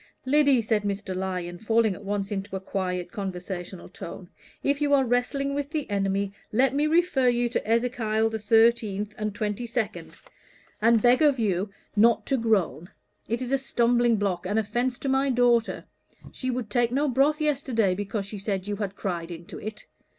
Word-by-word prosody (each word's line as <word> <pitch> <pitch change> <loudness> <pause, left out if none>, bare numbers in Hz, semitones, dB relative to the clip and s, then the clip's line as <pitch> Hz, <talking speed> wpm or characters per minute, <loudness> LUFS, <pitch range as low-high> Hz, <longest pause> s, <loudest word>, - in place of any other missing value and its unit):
"Lyddy," 280 -3 +4
said 215 -1 +1
Mr. 200 -1 -3
Lyon, 180 -2 -3
falling 225 -1 +2
at 200 - -11
once 200 0 -2
into 195 -1 -4
a - - -2
quiet 180 -2 -3
conversational 185 -2 -6
tone, - - -9 0.3
"if 280 +1 +1
you 285 -1 +4
are 270 -1 +3
wrestling 255 +3 0
with 285 0 -2
the 305 -3 -3
enemy, 195 0 0 0.2
let 255 +4 +3
me 295 +2 +2
refer 310 -6 +3
you 240 0 +1
to 230 - -2
Ezekiel 225 -2 +1
the 220 - -3
thirteenth 215 -1 +2
and 215 -1 -3
twenty 215 +2 -3
second, 225 -3 -3 0.7
and 230 0 +4
beg 245 +3 +5
of 290 -3 +4
you 200 -3 0 0.3
not 230 +2 +4
to 270 - +1
groan. 195 -7 0 0.4
It 235 +3 -2
is 250 - -5
a 275 - +2
stumbling 240 -2 +2
block 190 -4 -1
and 205 +3 0
offence 240 +4 0
to - - -5
my 270 +1 +2
daughter; 240 -2 +2 0.5
she 255 - -4
would 245 -4 -3
take 240 0 +2
no 285 +4 +1
broth 280 +4 +2
yesterday, 260 -9 +1
because 200 +1 -3
she 200 +1 -7
said 195 -2 -2
you 205 0 -3
had 200 -2 -4
cried 175 -4 -3
into 170 -1 -8
it. 215 0 -7
225 Hz, 180 wpm, -26 LUFS, 200-250 Hz, 0.7 s, beg